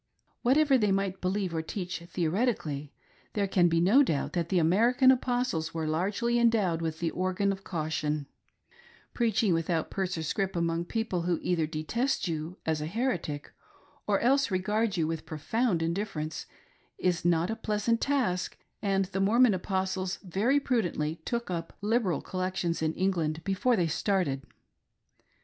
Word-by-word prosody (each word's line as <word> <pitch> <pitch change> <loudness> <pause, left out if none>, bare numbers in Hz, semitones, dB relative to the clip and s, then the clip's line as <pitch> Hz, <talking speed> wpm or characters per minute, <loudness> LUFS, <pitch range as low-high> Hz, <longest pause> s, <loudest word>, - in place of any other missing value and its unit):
Whatever 270 +1 +4
they 210 -3 +2
might 195 -1 -1
believe 185 -1 -1
or 160 - 0
teach 180 +1 -4
theoretically, 170 - -1 0.4
there 200 -2 0
can 180 -2 +4
be 165 0 +2
no 200 +11 +6
doubt 160 - 0
that 170 -2 -1
the 190 - +2
American 230 - +5
Apostles 245 -11 0
were 160 -1 -1
largely 200 +10 0
en 235 0 +6
dowed 185 -8 +1
with 160 -1 -2
the 165 -1 -1
"organ" 185 +2 0
of 195 0 -6
caution, 155 -3 -2 0.9
teaching 220 -4 +2
without 165 0 -1
purse 190 -2 -2
or 160 - -3
scrip 185 +5 -1
among 170 0 0
people 225 -3 -2
who 175 0 0
either 165 -3 +1
detest 180 - -1
you 160 +2 -4
as 160 -1 0
a 150 - -2
heretic 175 - -2 0.6
or 205 -1 +3
else 270 +1 +3
regard 210 +2 0
you 165 - +2
with 160 0 -3
profound 175 - 0
indifference 165 -3 -3 0.5
is 180 -2 0
not 175 +2 +2
a - - -1
pleasant 220 +2 0
task, 245 -11 0 0.2
and 195 -2 +1
the 195 +1 -3
Mormon 230 +3 +5
Apostles 190 0 -2
very 210 +10 +2
p 275 - -2
udently 165 -7 -1
"took 235 -5 -2
up" 165 -1 -5
lib 225 +4 +2
eral 170 -6 -1
collections 185 -2 -2
in 160 0 0
England 165 -4 0
before 195 +7 +2
they 180 -5 +2
started. 165 -4 0
185 Hz, 160 wpm, -29 LUFS, 165-215 Hz, 0.9 s, no